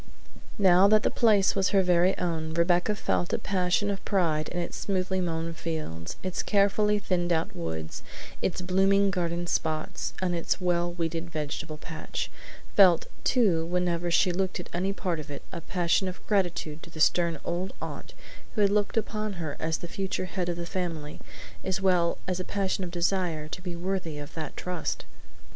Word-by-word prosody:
Now 190 Hz, -1 st, +6 dB
that 215 Hz, +1 st, +5 dB
the -, -, +2 dB
place 210 Hz, -5 st, +4 dB
was 195 Hz, -1 st, +2 dB
her 195 Hz, -2 st, +4 dB
very 180 Hz, +1 st, +4 dB
own 160 Hz, -2 st, -2 dB
Rebecca 175 Hz, +4 st, +3 dB
felt 175 Hz, -4 st, 0 dB
a -, -, +3 dB
passion 190 Hz, +2 st, +1 dB
of 195 Hz, -, -4 dB
pride 160 Hz, -6 st, +1 dB
in 175 Hz, -, -5 dB
its 170 Hz, -, -3 dB
smoothly 190 Hz, -1 st, -1 dB
mown 165 Hz, -1 st, -2 dB
fields, 155 Hz, -, -4 dB
its 185 Hz, -2 st, -1 dB
carefully 210 Hz, +1 st, +3 dB
thinned 180 Hz, -3 st, 0 dB
out 160 Hz, -1 st, 0 dB
woods, 80 Hz, -1 st, -4 dB, 0.4 s
its 185 Hz, -, -1 dB
blooming 195 Hz, +2 st, +3 dB
garden 175 Hz, -1 st, -1 dB
spots, 160 Hz, -2 st, -1 dB
and 185 Hz, -1 st, 0 dB
its 170 Hz, +2 st, 0 dB
well 175 Hz, -1 st, +1 dB
weeded 170 Hz, 0 st, -3 dB
vegetable 155 Hz, 0 st, -4 dB
patch; 160 Hz, +1 st, -5 dB, 0.4 s
felt, 180 Hz, -5 st, +7 dB, 0.2 s
too 200 Hz, -10 st, +3 dB
whenever 175 Hz, 0 st, 0 dB
she 175 Hz, +2 st, +4 dB
looked 185 Hz, +1 st, -1 dB
at 175 Hz, -, -7 dB
any 185 Hz, +3 st, 0 dB
part 180 Hz, -4 st, -2 dB
of 150 Hz, -, -8 dB
it, 145 Hz, -, -7 dB
a -, -, -5 dB
passion 180 Hz, +2 st, +1 dB
of 185 Hz, -, -7 dB
gratitude 175 Hz, -6 st, 0 dB
to 175 Hz, -, -11 dB
the 160 Hz, -, -10 dB
stern 170 Hz, 0 st, +3 dB
old 180 Hz, +2 st, -2 dB
aunt -, -, -7 dB, 0.4 s
who 215 Hz, -, +1 dB
had 200 Hz, -1 st, +5 dB
looked 205 Hz, +1 st, +1 dB
upon 215 Hz, -1 st, -1 dB
her 160 Hz, -5 st, -4 dB
as 160 Hz, 0 st, 0 dB
the 175 Hz, -, -7 dB
future 190 Hz, +1 st, -2 dB
head 180 Hz, -1 st, -2 dB
of 170 Hz, -, -2 dB
the 170 Hz, -, -4 dB
family, 170 Hz, -5 st, -4 dB, 0.4 s
as 190 Hz, 0 st, -1 dB
well 180 Hz, -3 st, +3 dB
as 185 Hz, -1 st, -1 dB
a -, -, -1 dB
passion 195 Hz, 0 st, -1 dB
of 180 Hz, -, -4 dB
desire 170 Hz, -3 st, 0 dB
to 180 Hz, -, -6 dB
be 180 Hz, -2 st, -5 dB
worthy 175 Hz, -3 st, -2 dB
of 145 Hz, +1 st, -8 dB
that 160 Hz, -2 st, -5 dB
trust. 180 Hz, -2 st, -3 dB
175 Hz, 185 wpm, -28 LUFS, 165-190 Hz, 0.4 s, felt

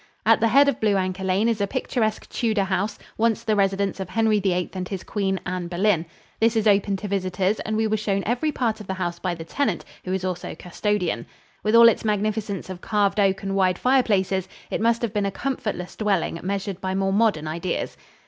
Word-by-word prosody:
At -, -, +5 dB
the 230 Hz, -, +3 dB
head 275 Hz, +5 st, +5 dB
of 280 Hz, -, +1 dB
Blue 210 Hz, -2 st, +2 dB
Anchor 185 Hz, 0 st, -2 dB
Lane 190 Hz, +4 st, +2 dB
is 225 Hz, -3 st, 0 dB
a 200 Hz, -, +1 dB
picturesque 225 Hz, -3 st, -1 dB
Tudor 220 Hz, -4 st, 0 dB
house, 195 Hz, +2 st, -1 dB, 0.2 s
once 230 Hz, -1 st, +2 dB
the 215 Hz, -, +1 dB
residence 195 Hz, 0 st, +1 dB
of 190 Hz, -2 st, -4 dB
Henry 220 Hz, 0 st, +2 dB
VIII 180 Hz, -2 st, 0 dB
and 185 Hz, -1 st, -4 dB
his 195 Hz, -3 st, -4 dB
queen, 195 Hz, -2 st, -1 dB
Anne 180 Hz, -1 st, -3 dB
Boleyn. 175 Hz, -1 st, +1 dB, 0.3 s
This 225 Hz, +1 st, +3 dB
is 220 Hz, -1 st, +1 dB
open 200 Hz, -1 st, +3 dB
to 205 Hz, -, -5 dB
visitors 190 Hz, +1 st, 0 dB
and 215 Hz, 0 st, -2 dB
we 220 Hz, -, +2 dB
were 215 Hz, 0 st, +1 dB
shown 200 Hz, -2 st, -1 dB
every 250 Hz, +7 st, 0 dB
part 230 Hz, -6 st, -1 dB
of 205 Hz, -, -10 dB
the 190 Hz, -, -2 dB
house 175 Hz, -2 st, -3 dB
by 180 Hz, -2 st, -2 dB
the 165 Hz, -, -7 dB
tenant, 220 Hz, -1 st, -1 dB, 0.2 s
who 185 Hz, -, -4 dB
is 190 Hz, 0 st, -1 dB
also 180 Hz, -1 st, -4 dB
custodian. 180 Hz, -, -2 dB, 0.3 s
With 215 Hz, +2 st, +2 dB
all 230 Hz, 0 st, +9 dB
its 230 Hz, -, +3 dB
magnificence 210 Hz, -1 st, -1 dB
of 185 Hz, -1 st, -7 dB
carved 205 Hz, -1 st, +1 dB
oak 195 Hz, -1 st, +2 dB
and 195 Hz, 0 st, -2 dB
wide 185 Hz, -2 st, +2 dB
fireplaces, 200 Hz, -8 st, +2 dB, 0.2 s
it -, -, -1 dB
must 230 Hz, +1 st, +2 dB
have 225 Hz, -3 st, -1 dB
been 205 Hz, -2 st, +1 dB
a -, -, -2 dB
comfortless 210 Hz, -5 st, -3 dB
dwelling 200 Hz, -5 st, 0 dB
measured 195 Hz, 0 st, -3 dB
by 190 Hz, 0 st, -2 dB
more 195 Hz, 0 st, +1 dB
modern 200 Hz, -8 st, +2 dB
ideas. 170 Hz, +3 st, -3 dB
200 Hz, 215 wpm, -24 LUFS, 185-220 Hz, 0.3 s, all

